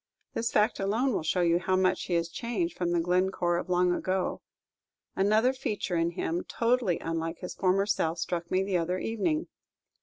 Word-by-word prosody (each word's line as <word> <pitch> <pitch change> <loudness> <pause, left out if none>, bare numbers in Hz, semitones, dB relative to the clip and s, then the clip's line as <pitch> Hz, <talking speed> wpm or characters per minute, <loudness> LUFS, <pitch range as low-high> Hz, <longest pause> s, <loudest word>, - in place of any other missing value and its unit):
This 230 - -1
fact 210 +1 +2
alone 225 +7 +1
will - - 0
show 160 +3 0
you 170 0 +3
how 185 +1 0
much 185 0 +1
he 175 - -1
is 170 0 +1
changed 185 -4 -2
from 175 -1 -1
the 175 0 +2
Glencore 180 0 +1
of 180 - -4
long 180 0 +3
ago. 185 +1 -1 0.7
Another 215 +6 +3
feature 210 -8 -3
in 165 0 +2
him, 170 +1 -2
totally 230 -6 +1
unlike 165 0 -3
his 180 - -6
former 195 +1 +2
self, 170 -5 0
struck 170 0 -3
me 185 +1 +2
the 195 -2 0
other 175 +2 -1
evening. 305 - -1
185 Hz, 185 wpm, -29 LUFS, 170-205 Hz, 0.7 s, you